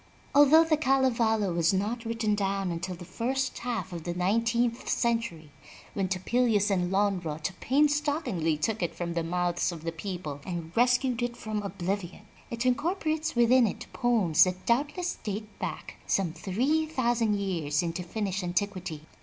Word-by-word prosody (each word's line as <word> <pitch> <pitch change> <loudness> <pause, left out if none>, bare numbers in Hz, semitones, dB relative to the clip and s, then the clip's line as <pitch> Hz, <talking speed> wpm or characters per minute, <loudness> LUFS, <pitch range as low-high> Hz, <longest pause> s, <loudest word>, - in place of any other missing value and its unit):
Although 290 +3 +7
the 320 -2 +2
Kalevala 235 - +2
was 170 +2 +2
not 225 +5 -2
written 225 -2 0
down 195 -2 -1
until 170 +2 -4
the 175 - -10
first 260 +7 -2
half 235 -6 -3
of 170 -2 -6
the 175 +1 -3
nine 195 +6 +2
teenth 235 +1 0
century, 230 - -1 0.4
when 195 -2 -1
Topelius 205 +2 +1
and 180 -2 +1
Lonnrot 185 -5 0
painstakingly 285 - +1
took 210 +8 -1
it 175 - -2
from 170 -1 -3
the 170 - 0
mouths 175 +1 0
of 165 -2 -8
the 165 - -2
people 165 -4 -6
and 170 -2 -6
rescued 250 +1 +2
it 240 0 -2
from 215 -1 -3
oblivion, 195 0 -4 0.2
it 235 +1 -3
incorporates 315 +3 0
within 240 0 +5
it - - -5
poems 215 -11 +4
that 185 0 -4
doubtless 295 +9 0
date 210 0 -4
back - - -5
some 180 -5 +1
three 250 - 0
thousand 240 -7 +1
years 170 -7 -1
into 170 +1 -3
Finnish 195 +1 -3
antiquity. 180 -3 -2
205 Hz, 155 wpm, -28 LUFS, 175-245 Hz, 0.4 s, Although